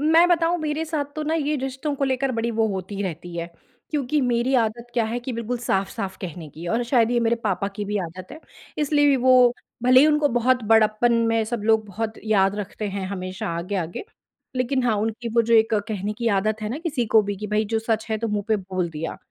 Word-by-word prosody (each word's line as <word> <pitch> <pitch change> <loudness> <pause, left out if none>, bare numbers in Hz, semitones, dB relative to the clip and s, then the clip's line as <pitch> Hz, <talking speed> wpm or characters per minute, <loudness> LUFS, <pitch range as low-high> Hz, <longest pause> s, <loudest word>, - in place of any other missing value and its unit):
मैं 320 +3 +5
बताऊँ 345 0 +2
मेरे 310 +1 -2
साथ 310 -2 -2
तो 310 - -2
ना 315 +2 -1
ये 300 -1 0
रिश्तों 270 +2 -3
को 275 - 0
लेकर 265 0 0
बड़ी 230 0 -1
वो 225 -1 +1
होती 190 0 -4
ही 200 - -2
रहती 175 -1 -5
है, 170 0 -3 0.4
क्योंकि 295 0 0
मेरी 245 +1 +1
आदत 230 +2 -3
क्या 235 - +2
है 230 +2 -2
कि 250 +1 -5
बिल्कुल 235 +1 -3
साफ-साफ 195 -2 -2
कहने 170 -3 -6
की 160 +4 -9
और 235 +2 +1
शायद 235 -2 +3
ये 240 -1 +2
मेरे 235 0 +2
पापा 195 0 0
की 205 - -3
भी 205 +1 -2
आदत 185 +6 -10
है। 315 - -10 0.4
इसलिए 290 -1 +3
भी 275 - +4
वो 250 -1 +5 0.3
भले 255 +1 +7
ही 295 - +6
उनको 300 -1 +3
बहुत 245 0 +2
बड़प्पन 220 +2 +4 0.2
में 225 -1 +2
सब 225 -1 -4
लोग 220 0 +3
बहुत 220 +2 -4
याद 195 -2 +3
रखते 205 +1 -4
हैं 195 -1 -4
हमेशा 185 -1 -5
आगे-आगे, 175 - -3 0.5
लेकिन 255 +1 0
हाँ, 220 -3 +2
उनकी 225 +3 -2
वो 235 - +5
जो 230 +1 +2
एक 225 0 +4
कहने 210 -1 -2
की 235 - +1
आदत 215 +2 -1
है 210 - -2
ना 255 - -4
किसी 300 -8 -2
को 215 0 +5
भी 200 0 -3
कि, 210 +2 -5
भई 210 +1 +1
जो 225 +1 -1
सच 220 0 -1
है 220 - 0
तो 230 - -2
मुँह 205 -1 -2
पे 215 - +3
बोल 185 -2 -3
दिया 160 +1 -5
225 Hz, 235 wpm, -23 LUFS, 205-255 Hz, 0.5 s, भले